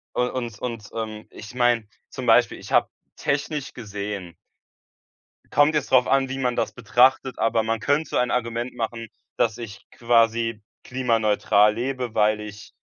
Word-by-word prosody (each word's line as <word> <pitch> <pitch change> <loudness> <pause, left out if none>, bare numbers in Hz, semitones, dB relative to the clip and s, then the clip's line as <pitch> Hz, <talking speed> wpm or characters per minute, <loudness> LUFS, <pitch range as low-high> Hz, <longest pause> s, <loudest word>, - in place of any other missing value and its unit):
un 125 0 +1
und 120 -5 -5
und, 115 -4 -5
ähm, 110 -1 -5
ich 110 +3 -11
meine, 120 -3 +2 0.2
zum - - -6
Beispiel, - - +4
ich - - -11
habe - - +3 0.3
technisch 145 0 -2
gesehen 100 -5 -6 1.2
kommt 145 +2 +4
jetzt 150 -3 -1
darauf 130 -1 +5
an, 135 0 +2
wie 135 +1 -4
man 125 -2 -1
das - - -1
betrachtet, 125 +3 +2
aber 115 0 +2
man 110 0 -1
könnte 145 +6 0
so - - -2
ein 125 0 +2
Argument 120 0 -2
machen, 115 0 -4 0.3
dass 110 -1 +1
ich 110 -4 -9
quasi 115 -1 +1 0.2
klimaneutral 110 -4 +2
lebe, 125 -1 -3
weil 105 0 +2
ich, 105 0 -10
115 Hz, 160 wpm, -24 LUFS, 110-125 Hz, 1.2 s, darauf